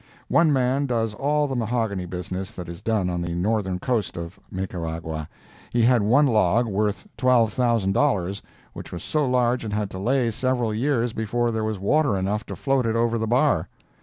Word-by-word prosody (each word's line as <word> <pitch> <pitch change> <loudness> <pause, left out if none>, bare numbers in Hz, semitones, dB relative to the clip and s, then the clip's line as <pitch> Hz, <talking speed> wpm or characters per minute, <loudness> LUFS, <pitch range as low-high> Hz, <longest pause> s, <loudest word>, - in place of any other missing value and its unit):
One 165 -2 +4
man 135 +1 +1
does 115 -3 0
all 145 +5 +1
the 135 - -3
mahogany 110 -6 -1
business 90 +2 -5
that 90 -1 -7
is 85 0 -8
done 110 -5 0
on 90 -1 -2
the 85 0 -3
northern 95 0 0
coast 110 -1 -1
of 85 +2 -7
Nicaragua. 80 -5 -4 0.4
He 120 -1 +2
had 120 -1 +4
one 125 +9 +4
log, 110 -2 +3
worth 105 - -1
$12,000, 115 -4 +2 0.3
which - - -9
was 85 - -6
so 150 -3 0
large 125 -1 +2
it 105 -2 -4
had 105 -2 -2
to 95 - -6
lay 120 +3 +1
several 125 -1 0
years 120 0 0
before 120 +2 -1
there 110 -1 -2
was 110 -1 -2
water 110 +3 +2
enough 100 +4 -2
to - - -5
float 135 -3 +1
it 115 - 0
over 115 0 +1
the 110 - -1
bar. 120 - +2
110 Hz, 185 wpm, -24 LUFS, 95-125 Hz, 0.4 s, One